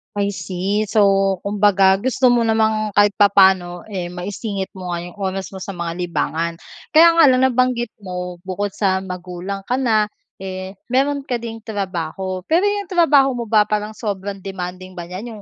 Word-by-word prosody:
I 200 0 0
see, 200 +3 -2
so 195 -2 +3
kumbaga 200 -1 +3
gusto 255 +1 +2
mo 235 -1 +3
namang 220 -2 +1
kahit 205 0 +5
papaano, 190 -3 +4
eh, 180 -3 -3
maisingit 190 +2 -5
mo 180 -2 -5
nga 170 0 -3
yung 175 +3 -11
oras 190 0 -3
mo 190 - -8
sa 195 +1 -6
mga 170 -1 -3
libangan. 170 -1 -1 0.4
Kaya 335 +2 +8
nga 330 - +8
lang 255 0 +4
nabanggit 250 -2 +1
mo 180 -2 -6
bukod 200 +2 -3
sa 190 -2 0
magulang 180 +2 -6
ka 250 - +1
na, 220 -5 +2 0.3
eh, 190 0 -7
meron 275 +2 0
ka 245 - -1
ding 225 -1 -6
trabaho. 185 -3 -4
Pero 335 +4 +3
yung 410 -2 -1
trabaho 300 -7 +4
mo 240 - -3
ba 210 -2 +4
parang 210 0 -2
sobrang 200 -3 -4
demanding 185 -1 -7
ba 175 - -6
niyan 215 +5 -7
yung - - -12
200 Hz, 175 wpm, -20 LUFS, 185-225 Hz, 0.4 s, Kaya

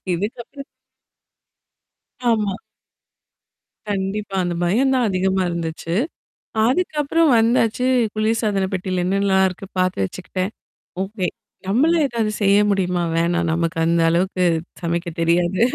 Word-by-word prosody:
இதுக்கப்புறம் 235 +9 -5 1.6
ஆமா. 210 -4 +1 1.3
கண்டிப்பா. 200 0 -3
அந்த 175 0 -2
பயம் 245 +10 +2
தான் 250 -2 +2
அதிகமா 190 0 +1
இருந்துச்சு. 165 -1 -4 0.7
அதுக்கப்புறம் 310 +1 +1
வந்தாச்சு, 230 +1 +2 0.3
குளிர் 220 +1 0
சாதன 200 -4 0
பெட்டியில 185 -1 -1
என்னலா 195 +1 +2
இருக்கு? 185 +2 -7
பார்த்து 185 - +1
வச்சுக்கிட்டேன். 185 - -4 0.5
ஓகே. 195 -2 -3 0.4
நம்மளா 300 +12 +3
ஏதாவது 225 -4 -1
செய்ய 200 0 +5
முடியுமா? 180 -3 0
வேணாம். 170 +1 +1
நமக்கு 165 +1 -1
அந்த 170 0 +2
அளவுக்கு 180 +2 +1 0.4
சமைக்க 170 +1 -2
தெரியாது. 175 +3 +2
190 Hz, 105 wpm, -21 LUFS, 175-225 Hz, 1.6 s, செய்ய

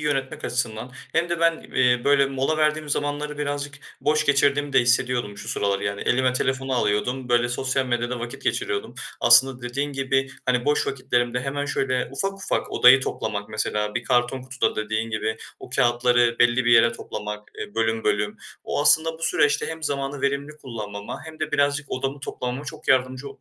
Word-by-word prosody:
yönetmek 135 -3 -2
açısından 120 0 -3 0.2
hem 170 +1 +1
de 170 -1 -1
ben, 165 -1 +3
eee, 125 -1 +3
böyle 140 -1 +4
mola 135 +3 -1
verdiğim 155 0 +1
zamanları 145 0 -2
birazcık 145 -1 -3 0.3
boş 150 +1 +1
geçirdiğimi 145 0 +2
de 135 - +6
hissediyordum 120 -3 +1
şu - - -8
sıralar; 100 -1 0
yani 100 0 -3
elime 130 +1 +2
telefonu 130 +1 -1
alıyordum, 125 +3 0
böyle 120 0 +3
sosyal 130 +2 -1
medyada 120 0 -1
vakit 120 +3 -7
geçiriyordum. 405 +1 -2 0.3
Aslında 130 -2 +5
dediğin 140 +4 -3
gibi, 135 0 0 0.2
hani, 125 -1 +1
boş 150 0 +2
vakitlerimde 125 -2 0
hemen 140 +2 -3
şöyle 130 -2 -1
ufak 195 +8 -1
ufak 195 - -3
odayı 125 +2 +7
toplamak, 105 -4 -3
mesela 105 -1 -2
bir 120 - -2
karton 125 +1 +1
kutuda 130 +1 -1
dediğin 110 +1 -2
gibi, 110 0 -2 0.2
o - - -11
kâğıtları 120 -1 +3
belli 120 +1 +4
bir 120 - +5
yere 115 0 +6
toplamak, 105 -2 -7
eee, 105 - -7
bölüm 115 0 0
bölüm. 105 0 0 0.3
O - - -1
aslında 160 +2 +4
bu - - -15
süreçte 150 -2 +2
hem 160 0 -6
zamanı 140 -1 -2
verimli 140 +2 -1
kullanmama 105 -5 -7
hem 160 0 -11
de 155 0 -3
birazcık 145 0 +1
odamı 135 +2 -3
toplamama 125 0 -4
çok 155 +1 -9
yardımcı 130 0 +2
130 Hz, 175 wpm, -24 LUFS, 120-145 Hz, 0.3 s, odayı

